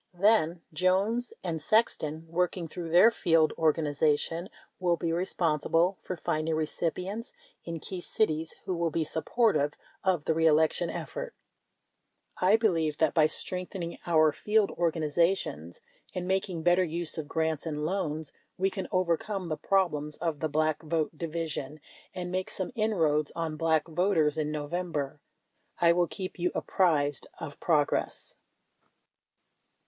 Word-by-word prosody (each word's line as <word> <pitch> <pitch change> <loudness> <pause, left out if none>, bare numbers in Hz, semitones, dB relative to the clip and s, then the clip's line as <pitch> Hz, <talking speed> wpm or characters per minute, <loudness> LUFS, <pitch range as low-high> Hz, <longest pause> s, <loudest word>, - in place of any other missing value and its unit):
Then, 180 -4 +3
Jones 195 +8 +1
and 165 -4 -2
Sexton, 160 -5 +1
working 175 +1 -1
through 170 +1 -6
their 180 +8 +7
field 165 -7 +3
organization, 155 +2 +1 0.3
will 175 -2 +2
be 165 +1 -1
responsible 170 0 +1
for 185 - -5
finding 155 0 -1
recipients 180 - -2 0.3
in 165 -1 -4
key 185 +3 -6
cities 160 -6 -1
who 185 - -1
will 170 -1 0
be 160 +1 0
supportive 155 -2 +1 0.3
of 180 -6 +1
the 160 - +2
re 165 0 +3
election 160 +2 +3
effort. - - -5 1.0
I 185 +4 +5
believe 165 -9 +1
that 160 -2 +2
by 155 -2 +5
strengthening 180 +1 -4
our 155 -2 +5
field 210 +7 +1
organizations 165 - 0 0.3
and 180 -1 -3
making 190 -3 -1
better 175 +2 +4
use 170 -1 -1
of 150 - -5
grants 160 0 -1
and 150 -1 -2
loans, 160 -4 -2 0.2
we 190 +1 +1
can 190 - -4
overcome 185 +1 0
the 155 - 0
problems 150 -6 0
of 165 -3 -2
the 155 - -1
Black 155 0 +1
Vote 160 0 -1
Division, 155 -3 -4 0.4
and 180 -1 -4
make 185 0 -2
some 185 - -4
in 220 -2 0
roads 150 -3 +2
on 165 -2 -2
Black 160 0 +1
voters 165 -3 +2
in 155 -1 -1
November. 150 -1 -3 0.6
I 170 0 +5
will 175 0 +2
keep 185 -1 -6
you 180 +1 +1
apprised 145 -7 +1
of 145 - -8
progress. 150 -4 0
165 Hz, 140 wpm, -29 LUFS, 155-185 Hz, 1.0 s, their